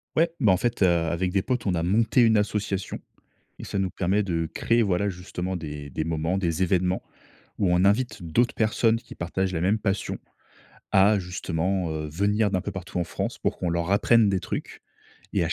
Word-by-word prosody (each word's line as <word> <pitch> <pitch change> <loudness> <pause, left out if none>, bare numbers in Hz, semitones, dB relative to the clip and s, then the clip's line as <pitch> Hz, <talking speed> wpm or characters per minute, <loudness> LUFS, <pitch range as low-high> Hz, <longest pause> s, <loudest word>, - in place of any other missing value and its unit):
Ouais, 165 +1 +2
bah, 105 -7 +5
en - - +2
fait, 120 +1 -2
heu, 95 - +6
avec 85 +1 +1
des 95 - +2
potes, 125 +3 -2
on 95 - +1
a 85 - -1
monté 110 +7 +3
une 110 -2 +5
association 105 -2 -2 0.6
et - - -7
ça 100 - -3
nous 95 -1 0
permet 95 +4 0
de 85 -4 -2
créer, 115 0 +2
voilà, 100 0 +1
justement 90 0 -5
des 75 -3 -6
des 80 - -3
moments, 80 +3 -1
des 85 -1 0
événements, 90 0 +1 0.6
où 95 -4 +2
on 90 +2 +3
invite 110 +1 +1
d'autres 115 +9 +1
personnes 110 +1 +2
qui - - -13
partagent 95 +2 -2
la 80 - -1
même 100 +5 +2
passion, 100 -2 -2 0.8
à 100 +2 +5
justement, 90 -1 -2
heu, 75 -1 -4
venir 100 +6 +1
d'un 95 -2 0
peu - - -4
partout 90 -1 -5
en 90 - +1
France - - -4
pour - - -2
qu'on 90 - -1
leur 85 +1 -1
apprenne 110 +1 +4
des 95 -2 0
trucs - - -6 0.5
et 100 - +2
à - - -1
ch - - 0
95 Hz, 210 wpm, -25 LUFS, 85-105 Hz, 0.8 s, heu